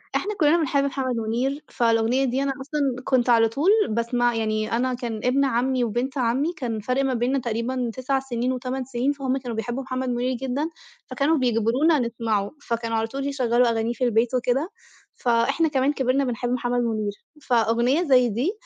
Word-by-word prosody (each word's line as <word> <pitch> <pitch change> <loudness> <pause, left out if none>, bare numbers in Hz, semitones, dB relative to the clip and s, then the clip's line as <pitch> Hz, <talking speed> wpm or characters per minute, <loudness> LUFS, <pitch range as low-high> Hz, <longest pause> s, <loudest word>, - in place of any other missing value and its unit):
إحنا 420 0 -1
كُلّنا 310 +2 +4
بنحب 285 -3 +1
محمد 265 -2 -1
مُنير، 245 +6 -2
فالأغنية 230 +2 +2
دي 260 +2 0
أنا 275 -1 0
أصلًا 295 +2 -3 0.2
كنت 255 -2 +2
على 225 -2 +5
طول 285 - +1 0.2
باسمع 235 +1 0
يعني 215 -1 -1
أنا 250 +2 0
كان 240 -3 -4
ابن 270 +3 +2
عمي، 255 0 +1
وبنت 245 +5 -2
عمي 260 +7 +1
كان 235 -7 -3
فرق 255 +6 0
ما 265 - 0
بيننا 250 +3 0
تقريبًا 240 +1 -2
9 260 +2 -1
سنين 250 -1 -2
و8 255 +1 -3
سنين، 255 +2 0
فهُم 270 -2 -2
كانوا 245 -3 -5
بيحبوا 240 +4 -3
محمد 255 0 -3
مُنير 245 +1 -1
جدًا، 265 +5 -2 0.4
فكانوا 300 +3 +1
بيجبرونا 255 +5 +2
نسمعه، 225 -4 -1
فكانوا 230 -3 -2
على 225 0 0
طول 275 +4 -4
يشغَّلوا 250 -3 +2
أغانيه 230 +1 0
في 240 - -4
البيت 235 0 +2
وكده، 255 +6 0 0.5
فإحنا 255 +7 +2
كمان 275 -1 +1
كبرنا 265 0 +1
بنحب 245 -1 -2
محمد 245 0 0
مُنير. 215 -3 -1 0.3
فأغنية 240 +5 +2
زي 255 -6 +4
دي 245 - 0
250 Hz, 175 wpm, -24 LUFS, 235-270 Hz, 0.5 s, على